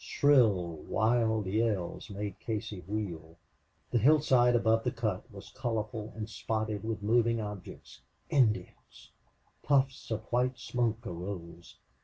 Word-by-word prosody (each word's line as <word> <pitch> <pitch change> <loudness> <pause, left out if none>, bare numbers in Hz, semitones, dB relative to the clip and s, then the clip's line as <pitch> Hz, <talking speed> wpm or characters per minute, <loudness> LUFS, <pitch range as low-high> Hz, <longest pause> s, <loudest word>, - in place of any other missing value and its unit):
Shrill 105 - +3
wild 110 +5 +1
yells 105 -1 -1
made 100 -1 -5
Casey 105 -3 -4
wheel. 85 -6 -4 0.5
The 120 - +3
hillside 130 -2 +5
above 115 -1 +3
the 125 - +1
cut 115 -1 -3
was 100 -2 -11
colorful 110 -3 -3
and 110 -1 -4
spotted 110 -1 -3
with 110 -2 -3
moving 115 +1 +3
objects. 105 -4 -8 0.3
Indians! 120 -7 0 0.5
Puffs 135 -2 +1
of 110 -1 -2
white 125 +1 +1
smoke 120 -2 -1
arose. 85 -2 -7
110 Hz, 120 wpm, -31 LUFS, 100-120 Hz, 0.5 s, hillside